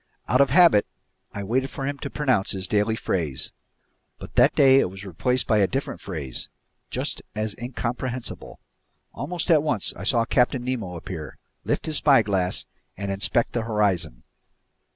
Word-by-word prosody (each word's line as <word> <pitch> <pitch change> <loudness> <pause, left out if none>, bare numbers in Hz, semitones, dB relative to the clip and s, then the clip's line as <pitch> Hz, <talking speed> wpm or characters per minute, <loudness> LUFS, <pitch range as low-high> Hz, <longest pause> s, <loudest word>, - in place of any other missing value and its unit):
Out 125 - +4
of 140 - +4
habit 165 - +6 0.4
I 100 - -5
waited 130 +6 0
for 135 - -5
him 140 0 -3
to 140 - -5
pronounce 130 -11 +1
his 95 -2 -3
daily 105 +2 +1
phrase. 80 -11 -2 0.7
But - - -11
that - - +4
day 135 -1 +6
it 90 - +1
was 95 +2 -10
replaced 125 +8 0
by 110 -2 +3
a 100 - +4
different 135 +6 -4
phrase, 75 -9 -4 0.4
just - - -3
as 110 -1 -2
incomprehensible. 125 0 -4 0.5
Almost 170 +5 -2
at 155 -3 +6
once 145 -9 0
I - - -8
saw 115 +3 +2
Captain 125 +1 +2
Nemo 115 -9 -3
appear, 80 -2 -7 0.3
lift - - -1
his 155 -2 +1
spyglass, 100 -10 +2 0.3
and 100 0 -3
inspect 100 +4 +1
the 120 - 0
horizon. 100 - 0
115 Hz, 160 wpm, -24 LUFS, 95-130 Hz, 0.7 s, habit